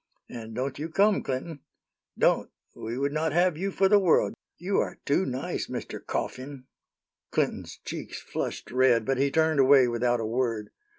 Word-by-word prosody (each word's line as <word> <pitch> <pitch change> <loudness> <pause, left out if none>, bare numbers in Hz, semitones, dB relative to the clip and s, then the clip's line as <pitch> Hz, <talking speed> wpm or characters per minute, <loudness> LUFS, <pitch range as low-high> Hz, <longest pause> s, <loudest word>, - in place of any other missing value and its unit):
And 115 -2 -8
don't 130 +3 -3
you 155 +2 -4
come, 200 +5 +3
Clinton 140 +4 -4 0.6
don't. - - +2 0.3
We 115 +2 -5
would 140 +1 0
not 155 0 -1
have 175 0 +3
you 190 +5 -2
for 195 0 +2
the 205 +1 +6
world. 185 -4 +3 0.2
You 190 +4 0
are - - -2
too 160 +7 +2
nice, 130 0 -3
Mr. - - -6
Coughin." 130 0 -5 0.6
Clinton's - - -2
cheeks - - -6
flushed - - -5
red, 125 -3 +3
but 135 -1 0
he 140 +1 +3
turned 160 0 +2
away 135 -1 +6
without 120 0 +1
a 115 - -2
word. 115 -2 -1
135 Hz, 170 wpm, -27 LUFS, 125-160 Hz, 0.6 s, the